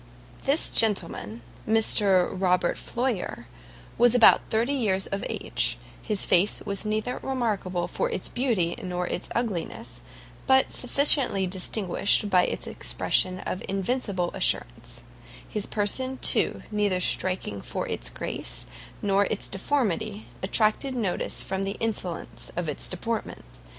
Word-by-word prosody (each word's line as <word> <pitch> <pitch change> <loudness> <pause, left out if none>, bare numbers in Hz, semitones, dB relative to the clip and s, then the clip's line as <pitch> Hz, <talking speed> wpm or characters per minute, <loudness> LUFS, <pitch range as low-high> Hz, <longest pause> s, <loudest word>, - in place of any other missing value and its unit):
This 280 +4 +3
gentleman, 165 - 0 0.4
Sir 195 -4 +4
Robert 180 -1 +1
Floyer, 235 - -3 0.5
was 240 0 +5
about 235 - +7
thirty 230 +5 +1
years 200 -8 +1
of 195 - -4
age; - - -1 0.2
his 210 -3 0
face 185 +4 +3
was 200 +1 -3
neither 215 +4 -1
remarkable 210 -9 -1
for - - -1
its 185 - -2
beauty 225 -10 0
nor 180 -2 -3
its 175 - -4
ugliness, 210 - -3 0.5
but 265 0 +4
sufficiently 255 -6 +3
distinguished 195 +2 0
by 180 -1 +5
its - - -3
expression 185 0 -1
of 185 - -4
invincible 195 -2 -1
assurance; - - -2 0.4
his 210 -1 -4
person, 255 +6 -1
too, - - +2
though 210 - -10
neither 205 -3 +2
striking 180 - 0
for - - -4
its - - -3
grace - - -3 0.4
nor 200 0 +3
its 210 - -1
deformity, 215 - -1 0.2
attracted 215 +7 +1
notice 210 -7 -2
from 190 0 -3
the 195 +1 -3
insolence 205 -6 -4
of 175 - -2
his 150 -3 -1
deportment. 225 - -4
200 Hz, 130 wpm, -26 LUFS, 185-230 Hz, 0.5 s, about